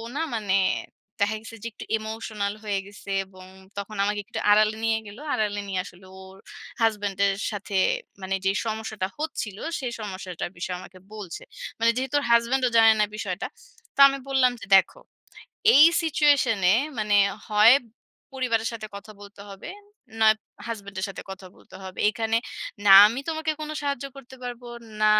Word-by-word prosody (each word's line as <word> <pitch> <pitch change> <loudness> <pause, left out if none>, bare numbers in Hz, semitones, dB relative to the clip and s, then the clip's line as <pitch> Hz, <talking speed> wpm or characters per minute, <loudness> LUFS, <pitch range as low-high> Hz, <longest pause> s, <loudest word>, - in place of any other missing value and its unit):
না 315 - -1 0.2
মানে 200 -2 +1 0.7
দেখা 215 +1 0
গেছে 225 0 -10
যে - - -3
একটু - - -9
ইমোশনাল 220 -2 -4
হয়ে 200 -2 -1
গেছে 200 0 -13 0.2
এবং 185 -1 -15 0.3
তখন 205 +1 -6
আমাকে 205 0 0
একটু - - -6
আড়ালে 215 +1 +4
নিয়ে 225 0 +2
গেল। 205 +3 -11 0.2
আড়ালে 205 -1 -1
নিয়ে 190 -1 -2
আসলে 185 0 -14
ওর 190 0 -13 0.4
হাসব্যান্ডের 200 -3 +1 0.2
সাথে 200 -1 -4 0.4
মানে 190 +1 -2
যে 195 - +4
সমস্যাটা 215 -3 -3
হচ্ছিল 295 -10 -4 0.2
সেই 250 -3 -3
সমস্যাটার 185 -4 -5
বিষয়ে 180 +1 -4
আমাকে 185 0 -13
বলছে। 200 -6 -8 0.4
মানে 230 0 +4
যেহেতু 265 +2 -2
ওর - - -5
হাসব্যান্ডও 245 +2 +3
জানে 225 -1 +7
না - - +4
বিষয়টা। 185 -3 -3 0.5
তো - - -10
আমি 275 0 -1
বললাম 260 -2 +4
যে - - -7
দেখো, 190 -1 +3 0.8
"এই 295 +3 +9 0.2
সিচুয়েশনে 280 - +3 0.3
মানে 210 -1 +1 0.3
হয় 215 +4 +7 0.6
পরিবারের 230 -4 0
সাথে 220 -2 -6
কথা 215 +2 -11
বলতে 200 0 -13
হবে, 195 - -9 0.5
নয় 220 0 +6 0.3
হাসব্যান্ডের 200 -3 -5
সাথে 195 - -8
কথা 190 0 -9
বলতে - - -15
হবে। 185 0 -9
এখানে 225 0 -1 0.5
না 195 - +8
আমি 235 +5 -2
তোমাকে 315 -1 -1
কোন 305 0 -5
সাহায্য 280 -2 -2
করতে 260 -1 -12
পারবো, 245 0 -7 0.3
না 215 - +4
215 Hz, 160 wpm, -25 LUFS, 195-235 Hz, 0.8 s, এই